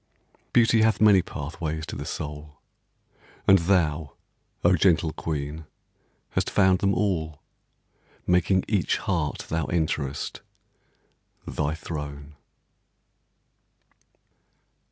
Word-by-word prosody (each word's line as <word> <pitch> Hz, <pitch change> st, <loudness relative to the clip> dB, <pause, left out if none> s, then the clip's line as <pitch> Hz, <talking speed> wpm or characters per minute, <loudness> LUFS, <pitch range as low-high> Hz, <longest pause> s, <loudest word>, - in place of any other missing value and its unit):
Beauty 115 Hz, -1 st, +4 dB
hath 110 Hz, 0 st, +3 dB
many 105 Hz, -3 st, +6 dB
pathways 80 Hz, +1 st, -5 dB
to 80 Hz, -, -7 dB
the 70 Hz, +2 st, -6 dB
soul, 75 Hz, -1 st, -6 dB, 0.9 s
And 95 Hz, 0 st, +7 dB
thou, 85 Hz, -5 st, +1 dB, 0.5 s
O 90 Hz, +1 st, +5 dB
gentle 80 Hz, -2 st, +2 dB
queen, 75 Hz, 0 st, -4 dB, 0.6 s
hast -, -, 0 dB
found 95 Hz, -2 st, +3 dB
them 100 Hz, 0 st, +1 dB
all, 80 Hz, -7 st, -1 dB, 0.9 s
Making 90 Hz, +1 st, +3 dB
each 100 Hz, -5 st, +1 dB
heart 85 Hz, -6 st, -2 dB
thou 80 Hz, -1 st, -1 dB
enterest 75 Hz, -2 st, -2 dB, 1.1 s
thy 75 Hz, 0 st, -2 dB
throne. 75 Hz, -2 st, -7 dB
80 Hz, 95 wpm, -25 LUFS, 75-95 Hz, 1.1 s, And